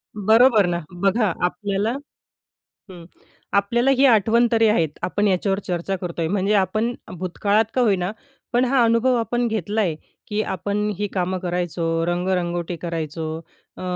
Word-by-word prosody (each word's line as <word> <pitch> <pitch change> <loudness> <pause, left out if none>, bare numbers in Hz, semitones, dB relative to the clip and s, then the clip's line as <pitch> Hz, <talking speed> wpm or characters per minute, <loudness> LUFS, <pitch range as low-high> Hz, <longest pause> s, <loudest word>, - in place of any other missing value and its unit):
बरोबर 220 +1 +5
ना. 175 -1 -1
बघा, 195 +3 +1
आपल्याला 200 +4 -1 1.0
हं. 175 -2 -11 0.5
आपल्याला 235 +6 +2
ही 270 +1 +4
आठवण 230 0 +4
तरी 225 -1 +4
आहेत, 165 -8 +2
आपण 205 +3 0
याच्यावर 195 +1 +1
चर्चा 180 +2 -2
करतोय. 170 -2 -3
म्हणजे 200 +2 0
आपण 215 +5 +1 0.2
भूतकाळात 200 +4 +1
का 255 - +3
होईना, 195 -4 +1 0.4
पण 245 +2 +3
हा 255 -1 +3
अनुभव 230 +2 +3
आपण 240 +1 0
घेतला 215 0 -1
आहे, 170 -6 0 0.3
की 210 0 -1
आपण 205 +2 -2
ही 205 0 -1
कामं 185 0 -1
करायचो, 170 -2 -1
रंगरंगोटी 175 -1 -1
करायचो 165 -1 -4 0.5
अ, - - -9
200 Hz, 140 wpm, -22 LUFS, 175-220 Hz, 1.0 s, बरोबर